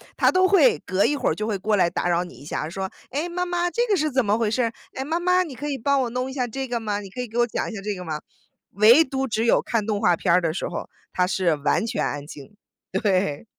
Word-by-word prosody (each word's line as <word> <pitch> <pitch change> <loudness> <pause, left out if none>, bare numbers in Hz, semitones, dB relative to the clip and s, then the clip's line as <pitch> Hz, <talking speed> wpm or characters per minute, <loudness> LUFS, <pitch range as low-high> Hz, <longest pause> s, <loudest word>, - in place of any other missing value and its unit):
他 - - +4
都 370 0 +4
会 430 +4 +5
隔 185 +2 +2
一 295 - +2
会 - - 0
儿 - - 0
就 215 - -3
会 210 -3 -1
过 210 +3 0
来 175 -3 +3
打 175 - -2
扰 175 0 +2
你 180 - -11
一 145 - -14
下， 150 - -3
说： 190 +2 -4 0.2
“诶， 295 +6 -2
妈 360 +1 -2
妈， 350 0 0
这 475 +6 0
个 410 - +3
是 310 0 +1
怎 260 -2 +1
么 205 +2 +2
回 225 -2 +1
事 245 +3 +1
儿？ 230 - 0 0.2
诶， 265 - -3
妈 325 +4 -1
妈 360 +1 +3
你 305 -6 -8
可 290 +4 -6
以 280 -2 -2
帮 280 +3 +1
我 245 - -1
弄 250 +2 -2
一 - - -7
下 250 -3 -1
这 265 +3 -4
个 240 -1 -2
吗？ 210 -2 -2
你 195 - -9
可 250 - -10
以 250 - -2
给 225 +2 -7
我 240 - +4
讲 - - -3
一 225 - -7
下 195 - -6
这 210 +1 -2
个 180 0 -8
吗？” 155 -2 -4 0.5
唯 225 - +7
独 265 0 -2
只 225 0 -1
有 - - +4
看 225 -3 -1
动 210 -1 -1
画 180 -5 +4
片 170 -3 +1
儿 180 - +5
的 160 -2 -1
时 - - -3
候， - - -6 0.2
他 180 - +2
是 185 -4 +1
完 150 +9 0
全 235 +1 -1
安 145 0 -4
静， 145 +6 -12 0.4
对。 190 -5 0
225 Hz, 320 characters per minute, -24 LUFS, 190-270 Hz, 0.5 s, 唯